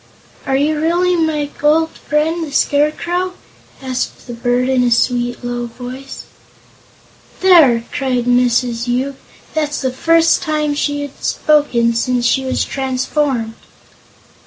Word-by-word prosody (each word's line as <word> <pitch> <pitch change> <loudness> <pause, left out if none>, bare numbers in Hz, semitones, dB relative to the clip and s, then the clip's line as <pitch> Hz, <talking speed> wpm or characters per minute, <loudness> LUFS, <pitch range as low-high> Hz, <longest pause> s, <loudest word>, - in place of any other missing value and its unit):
"Are 270 - +1
you 300 +3 +1
really 350 +3 +2
my 315 -3 0
old 320 +2 +3
friend, 320 +3 -1
the 305 - -6
Scarecrow?" 340 +6 0 0.5
asked; 255 -1 -4
the 240 - -7
bird, 245 +1 0
in 260 -1 +2
a 245 - +2
sweet, 245 +1 0
low 240 0 -3
voice. 255 +3 -9 1.2
"There!" 305 -11 +5
cried 255 -3 -1
Mrs. 245 -1 +1
Yoop; 260 +3 -2 0.3
"that's 300 -2 -1
the 260 -2 -1
first 330 +4 +3
time 305 -2 -1
she 290 0 -1
has 285 - -6
spoken 250 -6 +2
since 245 +1 0
she 265 +2 +2
was 260 -1 -1
transformed." 265 -2 -1
270 Hz, 130 wpm, -17 LUFS, 245-305 Hz, 1.2 s, There